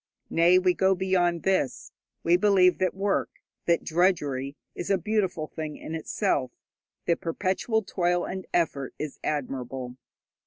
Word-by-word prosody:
Nay, 170 +2 +5
we 185 -1 +3
go 190 +1 +3
beyond 180 -2 +1
this: 185 -9 0 0.3
we 170 +1 +4
believe 185 -1 +4
that 185 0 +1
work, 195 +1 0 0.4
that 170 -1 +3
drudgery, 145 -6 +1 0.2
is 175 - -5
a 195 - +4
beautiful 190 -4 -1
thing 155 -1 -6
in 160 - -7
itself, 160 - 0 0.6
that 170 - +1
perpetual 190 +6 0
toil 175 -2 0
and 190 0 -5
effort 145 -6 0
is 150 -2 -5
admirable. 130 -3 -3
175 Hz, 140 wpm, -27 LUFS, 155-190 Hz, 0.6 s, Nay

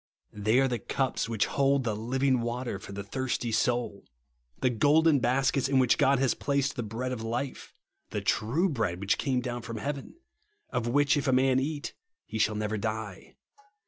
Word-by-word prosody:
They 110 +4 +2
are 135 - +4
the 120 -2 -2
cups 130 0 -1
which 110 -3 +1
hold 140 -1 +2
the 110 -3 -1
living 130 +3 +1
water 120 -3 -3
for 100 - -10
the 100 0 -5
thirsty 120 +2 -2
soul; 120 -3 0 0.6
the 130 - +2
golden 145 +5 +4
baskets 135 +2 +1
in 135 - +3
which 130 -2 +3
God 135 +1 +4
has 130 -1 +2
placed 140 0 -1
the 125 - -2
bread 120 +4 -4
of 125 -3 -4
life, 120 +4 -4 0.3
the - - -2
true 140 - +1
bread 110 - -1
which 100 +1 0
came 130 -2 0
down 120 0 -4
from 115 0 -6
heaven, 140 +5 -5 0.6
of 120 -1 -1
w^hich 145 +4 +3
if 145 0 -1
a - - +4
man 130 0 +3
eat 145 +2 -3 0.3
he 110 - -5
shall 110 0 +2
never 105 0 -2
die. 110 -2 -5
125 Hz, 185 wpm, -28 LUFS, 110-135 Hz, 0.6 s, are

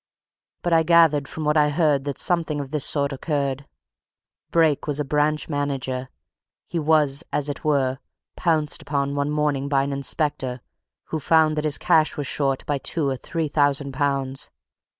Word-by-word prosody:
But 175 - +1
I 165 - +5
gathered 160 -4 +4
from 160 - -5
what 150 +1 +2
I 150 -1 +4
heard 145 -3 +1
that 140 -2 -3
something 165 -4 0
of 140 -2 -6
this 150 -3 0
sort 140 -1 0
occurred. 140 -1 -2 0.8
Brake 160 -4 +2
was 145 -1 -1
a 150 - -1
branch 150 +2 0
manager. 135 -3 -3 0.6
He 170 - -3
was, 150 -1 +2
as 145 0 -1
it 145 - -5
were, 135 -3 +1 0.4
pounced 155 -4 +1
upon 140 -1 -1
one 140 0 -1
morning 150 -2 0
by 135 -1 +2
an 140 0 -3
inspector, 140 -2 -2 0.5
who 160 - -2
found 155 +1 +3
that 150 0 -2
his 150 -1 +1
cash 160 -3 +2
was 145 - -2
short 135 -1 0
by 145 -2 -1
two 150 +2 -1
or 135 - -1
three 160 +4 -3
thousand 145 -1 +1
pounds. 135 -1 -2
145 Hz, 170 wpm, -23 LUFS, 140-155 Hz, 0.8 s, I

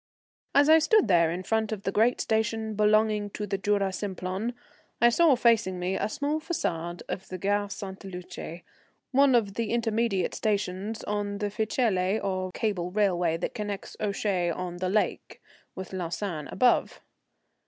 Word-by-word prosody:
As 285 +1 +6
I 320 +1 +8
stood 395 +6 +4
there 170 -4 +4
in 175 +3 -3
front 220 +2 0
of 205 -2 -4
the 195 - -1
great 225 +5 +3
station 220 0 0
belonging 215 0 +2
to 210 - -2
the 195 -1 -2
Jura 200 -1 +1
Simplon, 190 +4 -3 0.4
I 235 - +6
saw 305 +3 +5
facing 225 -6 +3
me 180 +1 -1
a - - -1
small 290 +5 -1
façade 175 - -3
of 190 - -5
the 185 - -5
Gare 205 +2 0
Sainte 195 -1 -7
Luce, 180 -2 -7 0.5
one 275 -1 +5
of 210 -4 +2
the 230 0 -2
intermediate 225 -4 0
stations 205 0 -2
on 205 -1 -2
the 205 0 -2
Ficelle 215 -3 +1
or 185 -1 -2
cable 180 -4 -2
railway 180 -4 +1
that 165 - -3
connects 205 -2 -5
Ouchy 200 -4 0
on 175 +1 -4
the 185 +1 -1
lake 210 +2 -1 0.4
with 190 0 -7
Lausanne 175 -3 -3
above. 250 -1 +2
205 Hz, 160 wpm, -27 LUFS, 185-220 Hz, 0.5 s, I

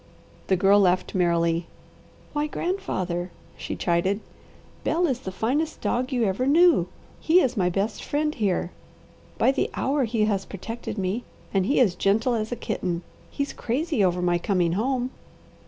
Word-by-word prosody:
The 190 - +3
Girl 195 +3 +5
laughed 185 -2 +2
merrily. 170 -2 +1 0.7
"Why 295 0 0
grandfather!" 185 - -2 0.3
she - - -5
chided, 180 +4 +1 0.6
"Bel 345 +2 +2
is 265 -7 0
the 190 - -6
finest 280 +11 -1
dog 255 +3 -1
you 245 -3 +1
ever 215 +5 0
knew, 340 +4 +5 0.3
he 335 +3 +4
is 260 -9 +1
my 180 -4 +2
best 200 +4 -2
friend 300 +1 0
here. 190 - 0 0.7
By - - +4
the 275 - 0
hour 275 0 +1
he 220 -1 +1
has 200 -3 0
protected 225 +4 -6
me, 195 +5 -1 0.3
and 195 -1 +2
he 275 - +3
is 220 -8 +4
gentle 220 +7 +2
as 220 0 -2
a - - -1
kitten. 175 -6 -3 0.3
He's 280 -1 -3
crazy 270 - -1
over 180 -1 +1
my 175 -1 +2
coming 175 -2 +1
home." 250 +6 0
215 Hz, 160 wpm, -25 LUFS, 185-265 Hz, 0.7 s, Girl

